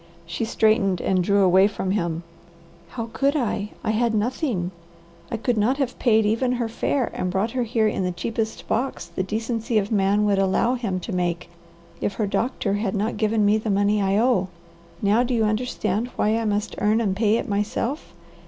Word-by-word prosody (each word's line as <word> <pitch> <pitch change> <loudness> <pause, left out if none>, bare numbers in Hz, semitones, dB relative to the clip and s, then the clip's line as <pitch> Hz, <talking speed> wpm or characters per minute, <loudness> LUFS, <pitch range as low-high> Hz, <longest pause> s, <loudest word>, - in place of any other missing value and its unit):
She 170 +7 -3
straightened 215 -4 +2
and 185 -1 +1
drew 200 +2 +3
away 190 +1 +5
from 195 -2 -3
him. 170 -4 -1 0.7
"How 230 +1 -6
could 280 +2 +1
I? 210 -6 -1
I 220 - +1
had 225 +1 +1
nothing. 215 - -1 0.6
I 230 - -2
could 225 +1 0
not 245 +6 +2
have 270 -4 -2
paid 220 -3 +3
even 230 +4 +1
her 240 -2 -1
fare 240 +3 -1
and 180 - -2
brought 195 +5 0
her 255 - -1
here 225 -2 +1
in 200 - -1
the 180 - 0
cheapest 220 +5 -4
box 255 -2 -1
the 170 +2 -4
decency 225 +3 -2
of 205 0 0
man 205 0 +2
would 200 -1 +2
allow 195 +5 +2
him 220 -7 -2
to 200 - -5
make 175 -1 -2 0.5
if 205 - -1
her 215 - 0
doctor 205 0 -1
had 205 -1 -1
not 210 +3 -1
given 215 -1 +2
me 210 +1 +3
the 220 - -4
money 205 +1 +2
I 195 0 +2
owe. 225 -5 +2 0.6
Now 205 +4 +4
do 250 0 0
you 225 - +2
understand 215 0 -1
why 215 +1 +2
I 230 0 -1
must 205 0 -1
earn 215 +2 +3
and 200 -5 0
pay 215 +1 +2
it - - -3
myself? 210 +7 -2
215 Hz, 200 wpm, -23 LUFS, 195-230 Hz, 0.7 s, away